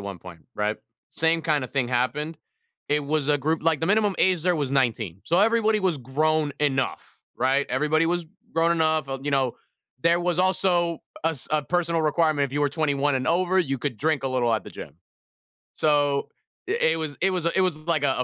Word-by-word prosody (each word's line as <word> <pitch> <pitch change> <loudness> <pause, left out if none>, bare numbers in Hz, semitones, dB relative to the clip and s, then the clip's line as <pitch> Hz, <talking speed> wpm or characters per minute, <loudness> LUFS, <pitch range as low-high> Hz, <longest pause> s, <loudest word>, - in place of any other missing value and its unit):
one 100 -2 -7
point, 85 -3 -13
right? 105 +1 -1 0.3
Same 165 0 +1
kinda 150 -5 0
thing 130 -1 -1
happened. 130 +6 -1 0.5
It 145 0 +1
was 150 -1 -1
a 145 - +4
group 155 +3 -1
like, 160 -3 +2
the 160 - 0
minimum 205 0 +2
age 180 -3 +2
there 180 -1 +2
was 145 -4 -2
19. 115 -9 0
So, 175 +3 +2
everybody 220 -1 +3
was 180 -6 0
grown 150 +4 0
enough, 135 -3 -1 0.2
right? 135 +2 +1
Everybody 150 +5 +1
was 175 -1 -1 0.3
grown 165 +1 +2
enough 155 -3 +1
of 135 0 -5
you 145 - -1
know, 135 -3 +1 0.4
there 170 +4 +3
was 175 -1 -1
also 180 -2 +2 0.3
a 165 - +3
s 150 -6 -7
a 155 -1 +1
personal 170 +1 0
requirement, 155 -2 +2
if 135 - -6
you 145 - -1
were 145 - +3
21 145 -1 0
and 130 - -3
over, 180 +3 +2
you 135 -7 0
could 130 -1 -4
drink 155 +3 0
a 135 - -1
little 120 -3 +1
at - - -2
the - - -11
gym. - - -10 0.8
So, 145 -2 +1 0.4
i - - 0
it 160 0 +1
was 155 -3 -4
it 190 - +3
was 180 -3 -2
a 170 - +2
it - - +4
was 185 -4 +1
like 155 -1 -1
a 135 -2 +2
155 Hz, 210 wpm, -25 LUFS, 135-170 Hz, 0.8 s, a